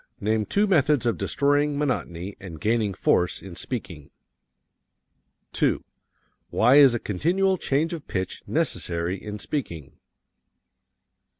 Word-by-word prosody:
Name 110 +1 0
two 205 +1 +2
methods 150 - +3
of 115 - +2
destroying 145 0 +1
monotony 100 - -2
and 85 -5 -9
gaining 110 0 +1
force 90 0 +1
in 95 -3 -10
speaking. 90 - -6 1.4
2. - - +1 0.7
Why 125 +5 +4
is 135 -4 +7
a - - -1
continual 180 - 0
change 155 +5 0
of 160 -4 -7
pitch 95 -2 -3
necessary 85 +2 -1
in 105 -1 -5
speaking? 85 - -5
115 Hz, 115 wpm, -25 LUFS, 95-145 Hz, 1.4 s, is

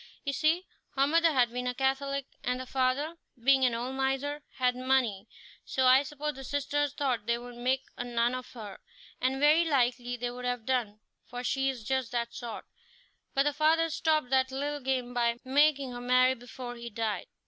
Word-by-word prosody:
You 280 - -1
see, 320 +6 +2 0.3
her 275 0 +4
mother 330 +3 +4
had 250 -5 +3
been 250 0 -2
a 250 - -1
Catholic, 275 +1 0 0.2
and 250 +1 -1
the 255 - -5
father, 270 +6 0 0.2
being 265 +2 +4
an 240 -2 +2
old 245 +3 -3
miser, 270 +2 -1
had 250 -1 +1
money, 250 -6 +1 0.4
so 260 - 0
I 255 +1 +7
suppose 295 +1 -4
the 270 - -9
sisters 285 +1 -1
thought 250 -7 -1
they 235 - +3
could 245 0 -10
make 255 +2 0
a - - -2
nun 240 0 +1
of 255 0 -6
her; 210 -5 -8 0.4
and 260 +1 +1
very 300 +4 +5
likely 245 -5 +1
they 245 0 -3
would 250 0 -7
have 245 -2 -2
done, 230 -5 -1 0.3
for 245 0 -6
she 270 +2 +1
is 250 -4 -5
just 260 0 -1
that 235 -1 -1
sort, 235 -2 -6 0.7
but 275 - +4
the 295 0 +1
father 320 +2 +3
stopped 310 -5 +1
that 260 0 +3
little 290 +2 -2
game 255 -2 -2
by 235 -1 +1
making 280 0 +3
her 245 0 -6
marry 255 +1 +4
before 245 0 -8
he 235 0 -7
died." 220 -1 -2
260 Hz, 195 wpm, -30 LUFS, 245-280 Hz, 0.7 s, I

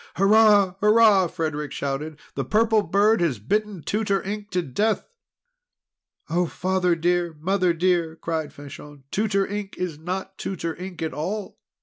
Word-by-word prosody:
"Hurrah! 205 -1 +5
Hurrah!" 210 -3 +5
Frederic 155 -4 -3
shouted. 145 +2 -4 0.2
"The - - -2
Purple 220 0 +3
Bird 205 +1 +2
has 160 -8 +1
bitten 200 - -2
Tutor 205 -2 0
Ink 205 +1 -5
to 180 -3 -1
death!" 205 - 0 1.2
"Oh, 175 +2 +1
Father 180 0 0
dear, 175 0 0
Mother 185 +2 +1
dear!" 170 -1 +1
cried 160 -2 -3
Fanchon. 145 0 -11
"Tutor 200 -2 +1
Ink 205 -1 -5
is 175 -5 -4
not 190 +3 -5
Tutor 170 -4 -4
Ink 180 -1 -7
at 160 - -3
all! 190 +8 -4
185 Hz, 140 wpm, -24 LUFS, 160-205 Hz, 1.2 s, Hurrah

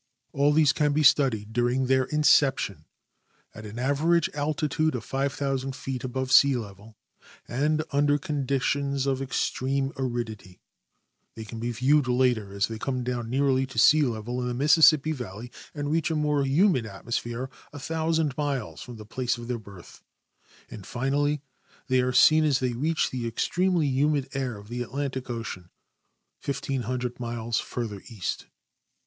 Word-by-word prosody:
All 140 +1 +3
these 150 -3 +4
can 150 +2 +1
be 155 +1 +2
studied 115 -7 +3
during? 120 +2 +1
their 130 0 +2
incejjtion 135 - +2 0.7
at 105 0 -9
an 105 +3 -9
average 150 +6 +1
altitude 150 0 0
of 120 - -4
5,000 135 -1 -2
feet 130 -1 -5
above 130 0 -3
sea 140 0 +6
level 105 -1 -8 0.5
and 150 +5 0
under 145 0 +3
conditions 140 -1 -1
of 135 -1 0
extreme 135 +1 -1
aridit}'; 115 -8 -5 0.8
they 110 - -7
can 115 +1 -8
be 120 +1 -2
viewed 135 +4 +2
later 125 -5 +1
as 100 0 0
they 110 -1 -7
come 130 +1 -2
down 120 -2 -3
nearly 135 0 +1
to 130 - -12
sea 150 +7 +6
level 120 -1 -2
in 125 - -2
tlie 120 0 -3
Mississippi 155 +1 +5
valley 120 -4 -7 0.2
and 145 0 -3
reach 165 +1 +1
a 160 - -1
more 150 -2 +1
humid 140 - +3
atmosj)here 120 +5 -4 0.2
1,000 160 0 -1
miles 140 -6 -3
from 125 -3 -9
the 110 -1 -10
place 120 +2 -2
of 120 0 -8
their 120 -1 -2
birth; 100 -4 -14 0.7
and. 105 -4 -9
finally, 145 +3 0 0.5
they 130 0 +3
are 125 0 0
seen 155 +5 +6
as 145 -4 +2
they 125 -2 -1
reach 155 +7 0
the 125 -2 -3
ex 115 - -1
tremely 180 -3 +1
humid 140 +1 +1
air 130 -5 -3
of 100 0 -13
the 120 +2 -4
Atlantic 130 +1 -4
ocean, 110 -7 -6 0.8
l,oOO 125 -2 -3
miles 115 -1 -2
farther 110 -5 -5
east. 105 -7 -4
130 Hz, 155 wpm, -26 LUFS, 120-145 Hz, 0.8 s, sea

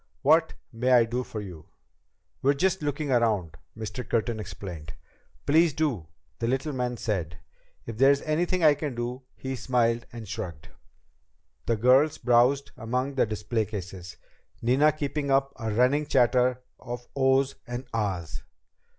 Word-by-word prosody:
"What 160 +3 +4 0.2
may 125 +3 +2
I 120 -2 +6
do 120 +2 -2
for 110 -3 -6
you?" 90 -6 -10 0.7
"We're 140 +2 +3
just 190 +4 +1
looking 145 -1 -2
around," 105 -10 +1 0.2
Mr. 110 +3 -5
Curtin 115 -1 -1
explained. 85 -7 -7 0.5
"Please 160 +1 +4
do," 130 - -1 0.3
the 115 - -1
little 135 +4 -1
man 125 -1 -2
said. 90 -8 -3 0.5
"If 115 -1 -7
there 135 +1 +7
is 140 0 +3
anything 175 +3 0
I 155 -2 +7
can 145 -3 -4
do 120 +2 -4
" - - -42
He 130 0 -5
smiled 120 -1 0
and 115 -3 -8
shrugged. 90 -8 -6 1.0
The 115 - +2
girls 130 +7 +4
browsed 130 +4 +3
among 125 +3 -2
the 130 - +2
display 110 +1 -1
cases; 95 -4 -7 0.4
Nina 135 +6 +4
keeping 145 -1 -3
up 135 0 +2
a 110 -3 -3
running 130 +7 +2
chatter 125 0 +3 0.2
of 120 0 -7
"oh's" 135 0 +3
and 120 +2 -5
"ah's." 95 -8 -2
125 Hz, 150 wpm, -27 LUFS, 110-140 Hz, 1.0 s, there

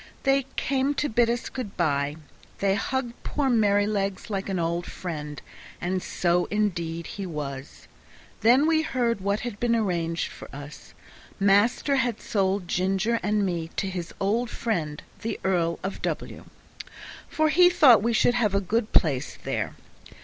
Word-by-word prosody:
They 270 -1 +2
came 275 +1 0
to 295 - 0
bid 235 +1 +3
us 240 0 -1
good 240 -6 -6
by. 145 -4 +1 0.4
They 195 -1 +2
hugged 240 +3 -2
poor 280 -3 0
Merrylegs 205 -2 +1
like 195 0 -2
an 190 - -1
old 170 +1 -1
friend, 150 -5 -6 0.4
and 185 +1 -1
so 175 0 +1
indeed 170 -6 -1
he 195 -2 -6
was. 140 -4 -6 0.5
Then 250 +6 +5
we 320 0 +3
heard 240 -8 0
what 200 +2 0
had 240 -4 -5
been 235 -1 +2
arranged 170 -6 -1
for - - -11
us. 145 +1 -10 0.4
Master 205 +8 +3
had 240 -4 0
sold 195 -2 0
Ginger 195 +6 +1
and 210 -1 +1
me 170 -3 -2
to 195 - -1
his 180 -3 -5
old 220 +5 0
friend, 165 -13 -3 0.2
the 225 -1 -3
Earl 170 -3 +1
of 195 +1 -4
W, - - -4 0.8
for 315 -2 +2
he 355 +4 +6
thought 275 - +7
we 235 +3 +1
should 240 +1 +3
have 220 -5 +1
a - - +4
good 215 +3 -1
place 140 -6 +2
there. - - -2
200 Hz, 155 wpm, -26 LUFS, 175-235 Hz, 0.8 s, thought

